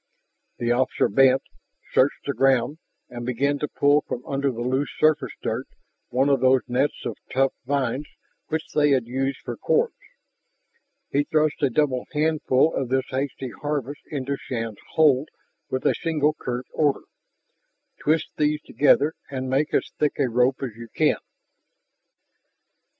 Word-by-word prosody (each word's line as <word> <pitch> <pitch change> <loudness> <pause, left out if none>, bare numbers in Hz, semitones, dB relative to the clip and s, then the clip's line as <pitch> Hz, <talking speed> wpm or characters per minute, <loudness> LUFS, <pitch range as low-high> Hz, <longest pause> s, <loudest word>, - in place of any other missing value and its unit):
The 120 0 0
officer 125 +2 +2
bent, 135 +4 +4 0.5
searched 135 +2 +2
the 140 - -1
ground, 135 +3 +2 0.3
and 120 -1 -7
began 140 +4 0
to 150 - -1
pull 145 +1 +3
from 125 - -5
under 140 0 0
the 120 -1 -6
loose 130 +3 0
surface 155 -1 +2
dirt - - -2 0.4
one 130 +3 +2
of 140 -2 +3
those 130 0 +4
nets 130 +4 0
of - - -3
tough 135 +1 +2
vines 140 0 -1 0.4
which 160 0 -1
they 150 -1 +4
had 130 -4 +1
used 135 +3 -2
for - - -5
cords. 460 0 +1 1.2
He 145 - +2
thrust 155 0 +1
a 140 - +3
double 130 -1 0
handful 155 -1 +2
of 130 -3 -2
this 130 0 +1
hasty 130 -1 -3
harvest 145 0 -4
into 140 -1 -3
Shann's 115 -4 -5
hold 150 -2 +4 0.4
with 130 - -3
a - - +4
single 155 -2 +1
curt 125 -3 -4
order: 145 -3 +1 1.0
"Twist 155 +1 +1
these 150 0 +2
together 145 +1 +3 0.2
and 130 -1 -4
make 145 +3 +1
as - - 0
thick 150 -1 +2
a 140 - +2
rope 125 +3 +2
as 120 -5 -4
you 115 0 -9
can!" - - +3
135 Hz, 150 wpm, -24 LUFS, 130-150 Hz, 1.2 s, bent